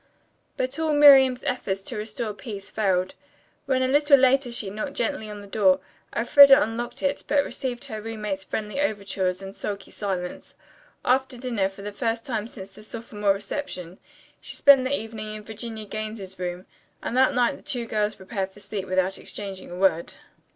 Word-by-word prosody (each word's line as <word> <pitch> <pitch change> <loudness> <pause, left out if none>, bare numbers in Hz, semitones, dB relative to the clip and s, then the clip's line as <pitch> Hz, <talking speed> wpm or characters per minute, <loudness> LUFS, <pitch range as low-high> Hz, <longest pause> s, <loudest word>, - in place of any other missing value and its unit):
But 260 +4 -2
all 320 -1 +1
Miriam's 270 -3 +7
efforts 195 -6 -2
to 240 - -5
restore 215 +1 -4
peace 205 -3 -8
failed. 185 -3 +1 0.5
When 260 -1 +2
a - - +2
little 290 +1 +5
later 260 -1 +3
she 215 -4 -3
knocked 215 +8 -5
gently 285 -8 -2
on 210 -1 -7
the - - -11
door, 195 -2 +3 0.4
Elfreda 275 +3 +8
unlocked 235 +2 -3
it, 280 0 0
but 285 -1 +3
received 250 -2 -4
her 215 -1 -6
roommate's 210 -3 -4
friendly 215 +8 -3
overtures 195 -6 -1
in 195 0 -7
sulky 200 -1 -5
silence. 185 -3 -4 0.5
After 260 0 +2
dinner, 235 -6 -1
for 195 +1 -12
the 205 - -4
first 230 +2 -2
time 225 -5 -2
since 195 -4 -9
the 215 - -13
sophomore 215 -2 -1
reception, 195 - -6 0.4
she - - -6
spent 275 -2 +6
the 280 +2 0
evening 215 -1 -7
in 215 - -8
Virginia 220 0 -7
Gaines's 215 -3 -6
room 180 +1 -4 0.4
and - - -3
that 260 -1 +4
night 245 +2 +2
the - - -17
two 245 -3 -3
girls 215 -1 -1
prepared 190 0 -4
for 190 - -17
sleep 200 -1 -5
without 185 +1 0
exchanging 195 -2 -6
a 175 - -7
word. 185 -3 +1
215 Hz, 180 wpm, -25 LUFS, 195-255 Hz, 0.5 s, Elfreda